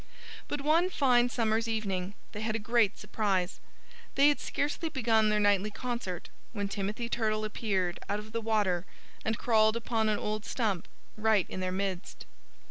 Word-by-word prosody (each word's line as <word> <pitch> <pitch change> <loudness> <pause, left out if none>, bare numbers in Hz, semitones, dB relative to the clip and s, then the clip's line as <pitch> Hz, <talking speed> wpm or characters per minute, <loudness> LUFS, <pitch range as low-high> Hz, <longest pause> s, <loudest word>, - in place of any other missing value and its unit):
But 290 - -3
one 325 +5 +3
fine 250 -7 +3
summer's 225 -2 +1
evening 200 -4 -2 0.2
they 210 - -6
had 220 0 -1
a 215 -2 -4
great 230 -4 +3
surprise. 200 -3 -1 0.6
They 280 +2 +6
had 290 - +1
scarcely 295 +3 -2
begun 225 -6 +3
their 210 0 +2
nightly 205 0 +3
concert 235 -7 -4 0.2
when 205 -3 -2
Timothy 205 +4 -3
Turtle 215 -2 0
appeared, 195 -5 -1
out 205 - +1
of 210 +1 -8
the 230 +1 -2
water 205 -5 +1 0.4
and 220 0 0
crawled 220 -2 +4
upon 225 -1 0
an 210 - +2
old 215 0 -2
stump, 220 -6 -1 0.3
right 215 -3 +3
in - - -5
their 185 0 -1
midst. 190 -1 -3
215 Hz, 165 wpm, -30 LUFS, 200-235 Hz, 0.6 s, They